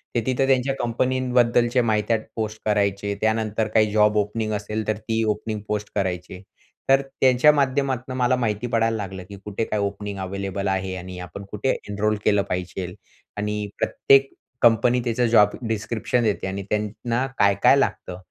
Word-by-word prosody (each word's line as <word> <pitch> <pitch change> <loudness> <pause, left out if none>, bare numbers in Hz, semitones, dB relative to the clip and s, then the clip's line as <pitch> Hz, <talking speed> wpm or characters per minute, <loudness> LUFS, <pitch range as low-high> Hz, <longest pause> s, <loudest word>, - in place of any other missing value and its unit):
ते 120 - +2
तिथे 130 +1 +1
त्यांच्या 135 0 +2
कंपनींबद्दलची 125 0 +2
माहित्या 110 0 +1 0.2
पोस्ट 110 -1 -3
करायचे. 100 -1 0
त्यानंतर 110 0 0
काही 110 -1 +3
जॉब 105 0 +3
ओपनिंग 110 +1 -1
असेल, 105 +1 -3
तर 110 - 0
ती 110 +1 -1
ओपनिंग 105 0 -5
पोस्ट 105 0 -3
करायचे. 90 -2 -3 0.5
तर 135 0 +6
त्यांच्या 135 +1 +4
माध्यमातून 130 -2 0
मला 125 0 +3
माहिती 115 -1 -1
पडायला 115 -1 +1
लागलं 95 -2 -6
की 100 - -10
कुठे 105 +2 -2
काय 105 - -2
ओपनिंग 100 0 -3
अव्हेलेबल 100 +1 -3
आहे 95 -1 -1
आणि 90 0 -8
आपण 90 +3 -8
कुठे 105 +5 -2 0.2
एनरोल 105 +1 0
केलं 100 -1 +4
पाहिजे. 90 0 -3 0.5
आणि 105 0 -2
प्रत्येक 135 0 +3 0.3
कंपनी 120 +1 +4
त्याचं 120 0 +1
जॉब 105 -3 +5 0.2
डिस्क्रिप्शन 115 +2 -1
देते 105 -3 0
आणि 95 +1 -4
त्यांना 115 +4 -1
काय-काय 100 +6 +5
लागतं, 95 -9 -1
110 Hz, 155 wpm, -23 LUFS, 100-120 Hz, 0.5 s, तर